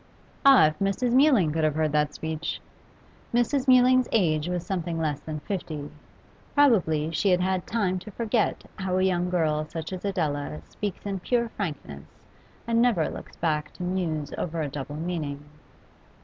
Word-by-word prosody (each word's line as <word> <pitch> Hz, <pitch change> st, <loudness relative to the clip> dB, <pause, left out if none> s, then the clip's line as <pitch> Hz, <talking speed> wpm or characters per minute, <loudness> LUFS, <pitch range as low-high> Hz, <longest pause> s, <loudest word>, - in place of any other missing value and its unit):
Ah, 275 Hz, -, +8 dB
if 155 Hz, 0 st, -1 dB
Mrs. 200 Hz, +5 st, 0 dB
Mewling 255 Hz, -, +5 dB
could 160 Hz, 0 st, 0 dB
have 155 Hz, -1 st, +2 dB
heard 155 Hz, -1 st, +1 dB
that 150 Hz, 0 st, +1 dB
speech! 160 Hz, 0 st, -4 dB, 0.7 s
Mrs. 255 Hz, +3 st, +1 dB
Mewling's 255 Hz, 0 st, +5 dB
age 160 Hz, -6 st, +2 dB
was 180 Hz, -1 st, -2 dB
something 175 Hz, -3 st, -2 dB
less 150 Hz, -3 st, -1 dB
than 155 Hz, 0 st, -6 dB
fifty; 155 Hz, -7 st, -5 dB, 0.6 s
probably 175 Hz, -, +3 dB
she 195 Hz, +5 st, +1 dB
had 180 Hz, -1 st, +4 dB
had 185 Hz, 0 st, -1 dB
time 190 Hz, -5 st, 0 dB
to 200 Hz, -, -10 dB
forget 225 Hz, +1 st, -1 dB
how 190 Hz, -2 st, -1 dB
a 185 Hz, -, +2 dB
young 180 Hz, -1 st, +1 dB
girl 155 Hz, -4 st, +1 dB
such 160 Hz, +3 st, -6 dB
as 185 Hz, -, -6 dB
Adela 145 Hz, -, -2 dB
speaks 205 Hz, -1 st, -5 dB
in 195 Hz, -1 st, -2 dB
pure 235 Hz, +4 st, 0 dB
frankness 145 Hz, -, -6 dB, 0.6 s
and 230 Hz, 0 st, +2 dB
never 230 Hz, -10 st, +2 dB
looks -, -, -9 dB
back 150 Hz, -2 st, -1 dB
to -, -, -7 dB
muse 165 Hz, -5 st, -2 dB
over 165 Hz, -2 st, -2 dB
a 145 Hz, -, -3 dB
double 145 Hz, +1 st, -6 dB
meaning. 150 Hz, -3 st, -4 dB
175 Hz, 165 wpm, -26 LUFS, 155-205 Hz, 0.7 s, Ah